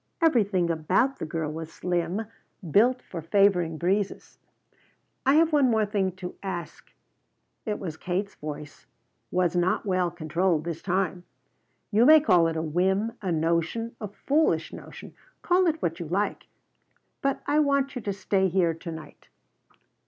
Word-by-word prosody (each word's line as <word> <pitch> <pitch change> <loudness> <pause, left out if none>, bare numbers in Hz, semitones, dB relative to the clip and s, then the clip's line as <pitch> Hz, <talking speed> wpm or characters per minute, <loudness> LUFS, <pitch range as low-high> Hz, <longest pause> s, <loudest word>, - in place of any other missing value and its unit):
Everything 205 - +2
about 185 - +1
the - - -4
girl 155 -1 -3
was 160 0 -7
slim, 175 +5 -2 0.5
built 245 - +4
for 170 - -7
favoring 175 -2 +2
breezes. 190 +4 -2 0.9
"I 275 - +5
have 325 0 +4
one 290 -2 +5 0.2
thing 205 -2 0
more 185 - -1
to 180 -1 -8
ask." 185 -3 -6 0.8
It 210 - -1
was 165 -5 -6
Kate's 190 +4 -3
voice 150 0 -8 0.4
was 180 -1 +1
not 175 +3 +1
well 185 -3 +1
controlled 170 0 0
this 165 -1 -5
time. 185 -1 -1 0.7
"You 225 +4 +5
may 315 +1 +9
call 180 - +4
it 165 0 -2
a 160 - -1
whim, 190 +7 +1
a 190 -3 -2
notion, 170 +8 -1 0.3
foolish 305 +3 +2
notion; - - -10 0.3
call 360 0 +3
it 320 -1 0
what 165 +1 -1
you 170 - -5
like, 195 +6 -2 0.7
but 275 0 -1
I 295 +1 +2
want 280 -2 +1
you 250 - -4
to 205 - -2
stay 190 0 +1
here 175 -2 +2
to 165 +1 -8
night." 160 -1 -11
185 Hz, 150 wpm, -26 LUFS, 165-220 Hz, 0.9 s, may